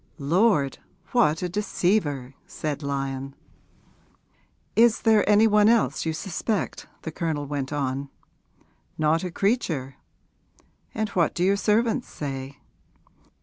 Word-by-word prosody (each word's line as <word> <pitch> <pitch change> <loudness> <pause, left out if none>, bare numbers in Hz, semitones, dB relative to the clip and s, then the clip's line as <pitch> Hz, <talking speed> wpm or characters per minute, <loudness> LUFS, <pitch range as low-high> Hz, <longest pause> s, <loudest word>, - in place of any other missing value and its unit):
'Lord, 160 -1 +2 0.3
what 170 -10 +2
a - - 0
deceiver!' 175 -8 -1
said 150 -1 -4
Lyon. 135 -1 -3 1.4
'Is 230 +1 +4
there 220 -2 +5
any 210 +1 +6
one 210 -1 +5
else 165 - +2
you - - +1
suspect?' 195 +5 -3 0.2
the 160 - -4
Colonel 155 -2 -2
went 140 -1 -4
on. 140 -1 -2 0.9
'Not 155 +2 +2
a 180 - -2
creature.' 165 - -1 1.0
'And 220 -1 -1
what 175 -4 +1
do 175 - 0
your 195 +2 +4
servants 225 +4 +1
say?' 135 -1 -6
165 Hz, 115 wpm, -25 LUFS, 140-210 Hz, 1.4 s, any